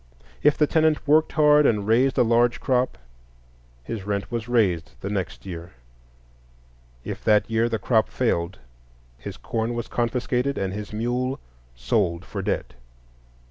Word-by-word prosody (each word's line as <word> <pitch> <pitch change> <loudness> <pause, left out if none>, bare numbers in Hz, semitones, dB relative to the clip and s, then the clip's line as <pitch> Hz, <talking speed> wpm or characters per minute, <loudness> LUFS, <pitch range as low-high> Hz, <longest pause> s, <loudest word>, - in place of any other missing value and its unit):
If 150 0 +4
the 150 - +4
tenant 155 0 +1
worked 155 +2 +4
hard 150 -1 +5
and 105 -3 +1
raised 125 +5 +3
a - - +5
large 120 +1 +2
crop, 125 - 0 0.9
his 100 - -5
rent 100 +1 -3
was 115 -1 -3
raised 90 - 0
the 100 - -4
next 95 -3 -4
year; 85 -2 -8 1.3
if - - -6
that 105 -1 +3
year 115 +1 +1
the 115 - -1
crop 110 +2 +1
failed, 85 +2 -1 0.6
his - - -8
corn 115 +1 -2
was 120 - -4
confiscated 125 +3 -1
and 95 -1 -2
his 105 +1 -6
mule 125 +4 -2 0.4
sold 85 - 0
for - - -5
debt. - - -2
115 Hz, 145 wpm, -24 LUFS, 100-125 Hz, 1.3 s, hard